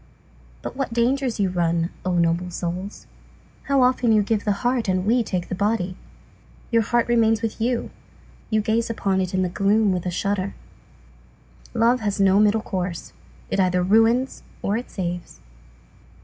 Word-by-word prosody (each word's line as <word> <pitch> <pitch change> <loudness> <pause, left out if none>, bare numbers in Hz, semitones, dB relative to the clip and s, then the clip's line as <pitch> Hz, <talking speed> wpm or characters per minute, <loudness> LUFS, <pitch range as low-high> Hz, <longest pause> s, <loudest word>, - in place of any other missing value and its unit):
But - - -6
what 265 -3 -3
dangers 250 0 +1
you 195 -2 +1
run, 170 -1 0
O 185 - -1
noble 170 +1 +1
souls! 180 +3 -5 0.6
Often 255 -3 +3
you 210 -1 +4
give 210 0 -1
the 210 - +2
heart, 245 -2 +1
and 185 0 0
we 240 +4 +3
take 185 -5 -3
the - - -5
body. 190 -2 -1 0.8
Your 230 -1 +4
heart 235 +2 +1
remains 225 -2 +2
with 225 0 -3
you, 240 +1 -1 0.6
you 215 -1 +2
gaze 225 +2 0
upon 195 -4 0
it 185 0 -2
in 185 - +2
the - - +1
gloom 200 +2 +2
with 180 0 -3
a - - +1
shudder. 195 +2 -2 1.2
Love 235 +2 +3
has 205 -3 -2
no 195 0 +4
middle 215 +1 +3
course; 180 -5 -4 0.4
it - - 0
either 180 -1 +2
ruins 225 +7 +3 0.2
or 200 - 0
it 240 +2 -4
saves. 175 -2 -5
205 Hz, 165 wpm, -23 LUFS, 185-230 Hz, 1.2 s, you